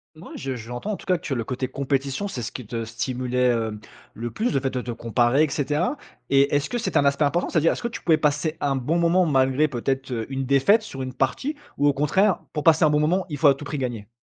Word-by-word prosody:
Mouais. 155 - -11
Je 130 -1 -4
j'entends, 120 - -5
en - - -2
tout - - -14
cas, 185 - +3
que 165 - -13
tu 135 - -2
le 115 -3 -2
côté 130 0 -3
compétition, 140 +6 -2
c'est 135 - -5
ce 115 - -4
qui 125 - -7
te 115 +1 -4
stimulait, 125 +2 -1
hem, 110 -3 -1 0.4
le 120 +1 -5
plus, 225 - -1
le 135 - +2
fait 135 0 -1
de 125 - -3
te 120 - -6
comparer 120 +4 +2
et 155 - -1
cetera. 150 - 0 0.3
Et 140 +1 +4
est-ce 145 +1 +1
que 245 - -1
c'était 235 - 0
un 140 - +2
aspect 140 +2 +2
important? 160 +5 +1
C'est-à-dire, 165 0 +3
est-ce - - -5
que 235 - -1
tu 235 - -7
pouvais 160 -2 +4
passer 150 +1 0
un 140 -1 +1
bon 150 +7 0
moment 170 +2 +3
malgré 135 +1 +3
peut-être, 135 +1 -2
heu, 115 -2 -2
une 135 0 -2
défaite 140 - +4
sur 135 -11 -7
une 130 0 -5
partie 200 - -1 0.2
ou 145 - +2
au 145 - +4
contraire 180 +8 +2
pour 150 -2 -3
passer 165 0 +5
un 155 - +5
bon 150 0 +2
moment, 180 +5 +1
il 150 - -4
faut 150 - +5
à 140 - +6
tout 145 - -10
prix 145 0 -4
gagner? 120 -6 -4
140 Hz, 270 wpm, -24 LUFS, 125-155 Hz, 0.4 s, à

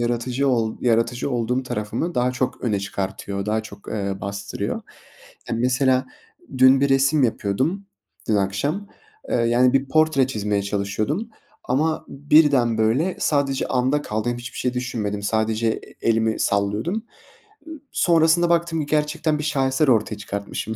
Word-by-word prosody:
yaratıcı 120 +3 0
ol 115 -3 0
yaratıcı 120 +2 +1
olduğum 125 +1 0
tarafımı 115 +8 -3
daha 125 +1 +1
çok 125 0 -2
öne 105 -5 0
çıkartıyor, 100 0 -4
daha 110 +1 0
çok, 110 - -12
ııı, 100 -2 -3
bastırıyor. 100 0 -4 0.7
Ya, - - -1
mesela, 130 +1 +2 0.5
dün 130 +1 +6
bir 140 - +3
resim 135 +2 +3
yapıyordum, 130 - -1 0.4
dün 110 - +3
akşam, 120 - -1 0.4
ııı, 115 -1 +2
yani, 125 +2 +4
bir 135 0 +1
portre 155 -3 +3
çizmeye 105 -5 -1
çalışıyordum 105 - -2 0.4
ama 155 +5 0
birden, 140 -5 +3
böyle, 130 +12 +1
sadece 140 -2 +1
anda 130 +3 +1
kaldım, 110 0 -2
hem 120 - -6
hiçbir 120 +1 -8
şey 125 0 -1
düşünmedim. 105 -5 -3
Sadece 110 +1 0
e 110 - -4
elimi 110 -1 +1
sallıyordum. 105 - 0 0.6
Iıı, 315 -3 -8
sonrasında 170 0 +3
baktım 170 -1 +1
ki - - -3
gerçekten 150 +1 0
bir 150 - -3
şaheser 135 -1 +1
ortaya 110 -3 +2
çıkartmışım. 100 +2 -5
125 Hz, 145 wpm, -22 LUFS, 110-145 Hz, 0.7 s, dün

